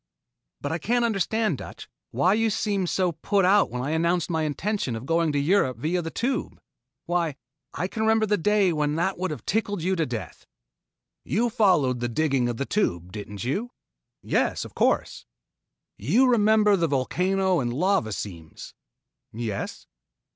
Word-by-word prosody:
"But 145 - -3
I 165 - -2
can't 240 +7 +1
understand, 215 - 0
Dutch, - - -9 0.2
why 140 +11 +2
you 225 +1 +2
seemed 200 -3 -1
so 185 -2 +1
put 185 +4 0
out 200 +2 +4
when 125 +1 -4
I 140 - -2
announced 170 +2 +1
my 160 -1 0
intention 155 - -2
of 115 +3 -6
going 165 +1 +1
to 145 - -1
Europe 140 - +2
via 165 +8 -1
the 165 - -4
Tube. 255 +9 -2 0.5
Why, 170 -4 0 0.4
I 180 - -1
can 220 - -5
remember 220 0 +3
the 210 0 +2
day 205 -1 +2
when 150 -1 0
that 175 +3 -1
would 185 - -1
have 150 -8 -7
tickled 205 -4 -1
you 190 +2 +1
to 165 -3 0
death." 110 -8 -7 0.8
"You 235 +3 0
followed 180 - +3
the 120 0 -2
digging 135 -1 +1
of 120 - -3
the 140 - -2
Tube, 90 - -1
didn't 105 0 -7
you?" 195 - -2 0.5
"Yes, - - 0
of - - -11
course." - - 0 0.7
"You 260 +3 +3
remember 215 -3 +4
the 170 -3 +1
volcano 180 +7 +1
and 120 -3 -1
lava 160 - +1
seams?" 85 -6 -7 0.6
"Yes." 110 -3 -5
170 Hz, 170 wpm, -25 LUFS, 135-205 Hz, 0.8 s, out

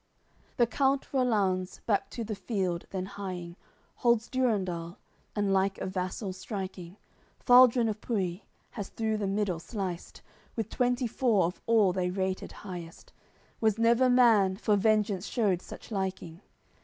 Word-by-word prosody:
CXLI - - -38
The 240 - +5
count 270 +3 0
Rollanz, 200 -8 +1
back 205 -3 +1
to 235 - -5
the 220 0 -4
field 190 -5 -2
then 185 -1 -3
hieing 180 -3 -6 0.4
Holds 235 -1 +2
Durendal, 185 -9 -1 0.4
and 205 -2 +1
like 195 0 +1
a - - -4
vassal 185 +1 -3
striking 185 -2 -6 0.4
Faldrun 245 -1 +6
of 215 -1 -3
Pui 190 -5 -2 0.3
has 205 -4 -6
through 220 -1 -1
the 205 -2 -2
middle 195 -3 -1
sliced, 185 -2 -6 0.3
With 225 -2 -3
twenty 245 0 +1
four 225 -5 +2
of 175 - -4
all 215 -5 +4
they 180 -1 0
rated 190 0 -2
highest; 175 -4 -9 0.5
Was 220 -2 +2
never 235 +3 +4
man, 225 -7 +5
for 210 -1 +2
vengeance 210 -2 +1
shewed 200 -7 +1
such - - -11
liking. 190 -4 -4
200 Hz, 145 wpm, -29 LUFS, 185-230 Hz, 0.5 s, Faldrun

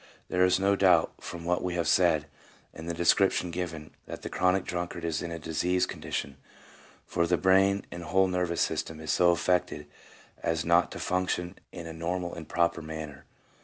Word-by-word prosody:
There 90 - +2
is 90 0 +4
no 100 +1 +3
doubt 90 -4 +4
from 85 -1 -8
what 90 +1 +1
we 90 -1 -2
have 85 -2 0
said, 80 -4 +3 0.5
and 80 +1 -8
the - - -1
description 90 +1 +3
given, 80 -3 -5 0.2
that - - -8
the - - -4
chronic 90 +1 +2
drunkard 85 -1 -4
is 80 -1 -1
in 85 - -4
a 85 - -5
diseased 90 +3 0
condition, 70 -1 -4 0.7
for 85 0 0
the 90 +1 +2
brain 95 +2 +3
and 85 0 -7
whole 95 +3 +3
nervous 90 -2 -1
system 80 -1 -2
is 80 -2 -3
so 90 - +4
affected 85 -3 +1 0.6
as 80 0 -1
not 85 +1 +3
to - - -7
function 90 -1 -1 0.2
in 85 - -8
a 80 - -7
normal 85 +2 -3
and 80 -2 -8
proper 85 0 +1
manner. 80 -2 -7
85 Hz, 185 wpm, -28 LUFS, 80-90 Hz, 0.7 s, is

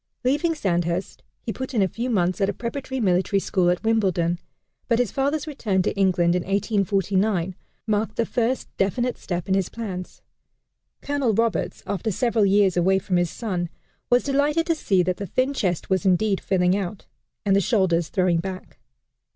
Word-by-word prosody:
Leaving 295 +6 +1
Sandhurst, 175 - -1 0.2
he 225 - -3
put 260 0 -5
in 210 - +4
a - - +2
few 235 +7 -4
months 185 -4 +1
at 195 - +3
a - - -1
preparatory 260 +5 -4
military 190 -1 +2
school 185 -2 +1
at 180 +3 0
Wimbledon, 185 -6 +1 0.5
but 235 - +3
his 245 -4 +1
father's 280 +2 0
return 215 -11 -1
to - - -1
England, 180 -3 +3
in 180 - +1
1849, 195 -1 0 0.3
marked 215 0 0
the 230 - +1
first 245 +2 -1
definite 240 +6 0
step 175 -2 -4
in 190 - +1
his 190 -2 +1
plans. 190 -6 -6 0.8
Colonel 280 -6 0
Roberts, 230 -1 0
after 205 +3 -2
several 220 0 +2
years 195 -2 +4
away 185 +2 +3
from 190 -1 0
his 175 -1 +1
son, 180 -6 -3 0.4
was 245 0 +4
delighted 290 +4 +1
to 335 - +2
see 195 - +1
that 180 +1 -1
the 200 - -5
thin 255 +9 0
chest 185 - -2
was 190 0 +2
indeed 195 +1 +2
filling 180 -1 +2
out, 195 0 -4 0.4
and 195 -1 +3
the 200 - +4
shoulders 175 -5 +1
throwing 180 -3 +2
back. 185 -6 -7
195 Hz, 175 wpm, -24 LUFS, 180-235 Hz, 0.8 s, in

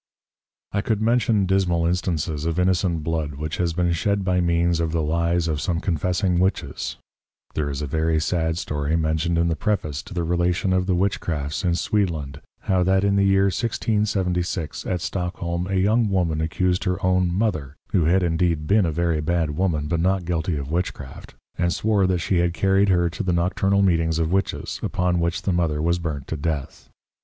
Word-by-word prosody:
I 100 - 0
could 110 0 -1
mention 115 -2 +2
dismal 90 -3 +1
Instances 85 -3 -1
of 85 0 -1
Innocent 90 -3 +1
Blood 80 -3 -2
which 75 +2 -4
has 85 -2 0
been 85 0 +1
shed 100 +4 0
by 90 -1 +2
means 85 0 +1
of 80 -1 0
the 80 -2 0
Lies 85 +2 +1
of 75 -3 -1
some 85 -3 -1
Confessing 90 +1 0
Witches; 90 -7 -1 0.6
there 75 -2 -1
is 70 +1 -3
a - - -1
very 80 +2 0
sad 80 +1 0
Story 75 -1 -2
mentioned 80 +1 0
in 85 0 +2
the 80 - 0
Preface 80 -8 -1
to - - -11
the 85 - 0
Relation 90 +3 +1
of 90 0 +1
the 95 - +2
Witchcrafts 85 -5 -1
in 85 -2 +1
Sweedland, 80 -9 -1 0.2
how 95 -1 +1
that 95 +2 +2
in 100 0 +2
the 100 - +3
Year 95 0 +4
1676, 100 -5 -1
at 90 -2 -1
Stockholm, 90 -1 -3
a 95 - -2
young 105 +4 +2
Woman 85 -5 0
accused 90 +3 0
her 90 0 0
own 90 -1 +2
Mother 85 -8 -1 0.2
(who 85 - +2
had 90 +3 +3
indeed 85 -2 0
been 100 +2 +3
a - - 0
very 85 -1 0
bad 80 -1 0
Woman, 80 -4 0
but 85 +1 0
not 95 +1 +1
guilty 80 -1 -1
of 70 +1 -5
Witchcraft,) 80 -6 -4 0.2
and 85 0 +2
Swore 100 -1 +2
that 90 -1 +1
she 90 - 0
had 85 0 +1
carried 95 +3 +3
her 85 -2 +3
to 90 - -5
the 95 -4 0
Nocturnal 95 +3 +1
Meetings 80 -3 +2
of 80 0 0
Witches, 95 +1 -1
upon 90 -1 0
which 85 -1 -1
the 95 - 0
Mother 85 -4 0
was 85 +3 +1
burnt 75 -5 -4
to - - -2
Death. 75 -2 -4
85 Hz, 195 wpm, -23 LUFS, 80-95 Hz, 0.6 s, Year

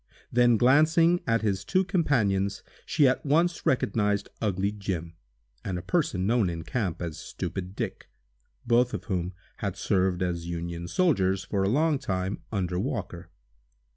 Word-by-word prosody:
Then 120 -1 +4
glancing 160 +8 +4
at 115 -1 +2
his 100 -2 0
two 185 +1 +2
companions, 115 - +1 0.2
she 145 -3 +4
at 130 - +1
once 165 +4 +1
recognized 105 -5 +1
"ugly 100 -2 0
Jim," 95 -5 -4 0.5
and 90 - -3
a 90 - -6
person 100 - 0
known 110 -3 +2
in 85 -1 -5
camp 95 -7 -2
as 80 -3 -5
"stupid 95 +1 -5
Dick," - - -5 0.6
both 120 +1 +3
of - - -6
whom 90 -3 -2 0.2
had - - -3
served 95 -1 +1
as 85 -1 -2
Union 85 0 -4
soldiers, 95 - +2
for 100 0 -1
a 95 - +2
long 150 +4 +2
time, 95 -6 -2
under 90 -4 -1
Walker. 95 -7 -4
100 Hz, 150 wpm, -27 LUFS, 90-130 Hz, 0.6 s, Then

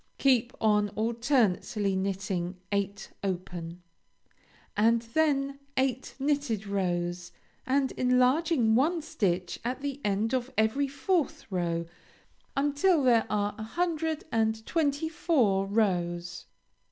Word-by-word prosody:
Keep 255 -3 +3
on 210 -1 +3
alternately 225 -4 +1
knitting 190 -2 -2
eight 200 0 -2
open, 175 -2 -4 0.9
and 230 +2 +3
then 275 +2 0 0.2
eight 260 -1 0
knitted 275 -7 0
rows, 175 -2 -2 0.4
and 270 0 +2
enlarging 255 0 +3
one 310 +7 +2
stitch 185 - -1
at 250 +3 -3
the 280 0 -4
end 210 +4 0
in 255 -2 +2
every 220 +6 +2
fourth 285 +4 -1
row 170 -2 -1 0.7
until 290 +3 +3
there 235 -3 +4
are 205 0 0
a - - -4
hundred 320 +4 -1
and 220 0 0
twenty 305 -1 0
four 240 - +1
rows. 180 -4 -1
225 Hz, 110 wpm, -29 LUFS, 195-275 Hz, 0.9 s, there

